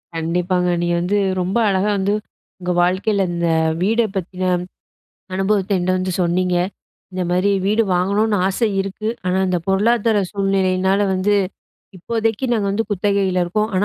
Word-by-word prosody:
கண்டிப்பாங்க 180 +2 0
நீங்க 175 0 +1
வந்து 190 +4 0 0.2
ரொம்ப 185 +5 -1
அழகா 195 +1 +1
வந்து, 195 +1 0 0.5
உங்க 180 0 -2
வாழ்க்கையில 195 +2 +1
இந்த 170 0 -1 0.3
வீட 225 +5 +2
பத்தின 185 0 -3 0.9
அனுபவத்த 195 +1 0
என்கிட்ட 175 +1 -1
வந்து 185 0 -2
சொன்னீங்க. 180 +1 +1 0.6
இந்த 185 0 -3
மாரி 185 +3 +2
வீடு 215 +3 +3
வாங்கணுன்னு 205 +4 +1
ஆசை 225 +4 0
இருக்கு. 195 +3 -5 0.2
ஆனா 180 +1 +1
இந்த 180 -1 +1
பொருளாதார 220 +3 +2
சூழ்நிலையினால 195 0 +1
வந்து 190 +2 +1 0.6
இப்போதைக்கு 225 +5 -2
நாங்க 215 -4 +1
வந்து 225 +3 0
குத்தகையில 195 -2 +1
இருக்கோம். 210 +5 -1
ஆனா 190 +2 +2
190 Hz, 140 wpm, -19 LUFS, 180-205 Hz, 0.9 s, வீடு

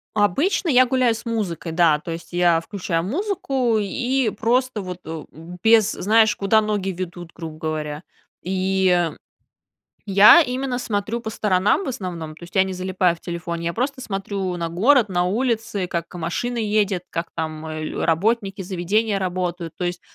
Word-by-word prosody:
Обычно 280 - +1
я 255 -3 +6
гуляю 250 -2 +2
с 225 - -9
музыкой, 200 -8 -3
да, 160 -3 +3
то 165 - -7
есть 165 +2 -8
я 175 -2 +3
включаю 170 -1 -3
музыку 270 - 0
и 245 +4 0
просто 235 +1 0
вот, 180 -1 -6
э, 160 -1 -6
б 165 +3 -11
без, 220 -2 +5
знаешь, 220 +2 +3
куда 200 +2 +3
ноги 210 -2 -1
ведут, 175 -2 -6
грубо 160 -2 -8
говоря. 155 -1 -4 0.4
И 185 -1 +1 1.0
я 200 - +8
именно 255 -1 -2
смотрю 220 -1 -2
по 230 - -6
сторонам 205 - +1
в - - -4
основном. 175 -10 -5
То 170 - -12
есть 175 - -15
я 190 - +6
не 190 - -4
залипаю 185 -1 0
в - - -23
телефоне, 170 -1 -5
я 170 - 0
просто 265 +3 -2
смотрю 195 -4 -3
на 170 -1 -2
город, 225 - +4
на 175 -1 +1
улицы, 220 -2 -1
как 170 -1 -4
машина 180 +9 -3
едет, 205 -4 +1
как 165 +1 -3
там, 160 -1 -4
а, 155 0 -5 0.3
работники, 195 +4 +1
заведения 195 +3 0
работают. 180 -2 -3
То 180 - -3
есть, 175 0 -3
190 Hz, 165 wpm, -22 LUFS, 175-225 Hz, 1.0 s, я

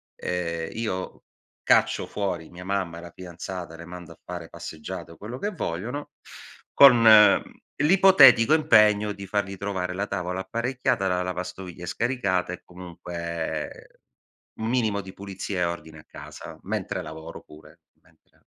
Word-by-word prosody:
ehm, 85 -2 -3
io 110 -5 -4 0.4
caccio - - +3
fuori 90 -5 -3
mia 90 +1 -11
mamma 95 -4 -2
e 85 - -9
la 85 - -10
fidanzata, 90 -1 -8
le 85 +1 -10
mando 90 -1 -10
a - - -26
fare 85 -2 -7
passeggiate 85 +1 -8
o 85 - -14
quello 115 +5 -7
che 205 - -2
vogliono, 125 - -4 0.6
con 125 -4 +8 0.7
l'ipotetico 150 -7 +7
impegno 105 -8 +4
di 100 -1 -9
fargli 100 -1 -2
trovare 95 -2 -3
la 100 +2 -2
tavola 90 -1 -3
apparecchiata, 120 -2 -1
la 90 0 0
lavastoviglie 90 -1 -6
scaricata 100 -5 -1
e - - -8
comunque 85 -2 -6 0.6
un 110 - -2
minimo 110 -5 +1
di 95 0 -10
pulizia 95 -1 -6
e - - +2
ordine 85 -2 -5
a - - -19
casa, - - -10
mentre - - -3
lavoro 80 +1 -9
pure, 75 0 -17 0.2
mentre. - - -30
95 Hz, 140 wpm, -25 LUFS, 85-110 Hz, 0.7 s, con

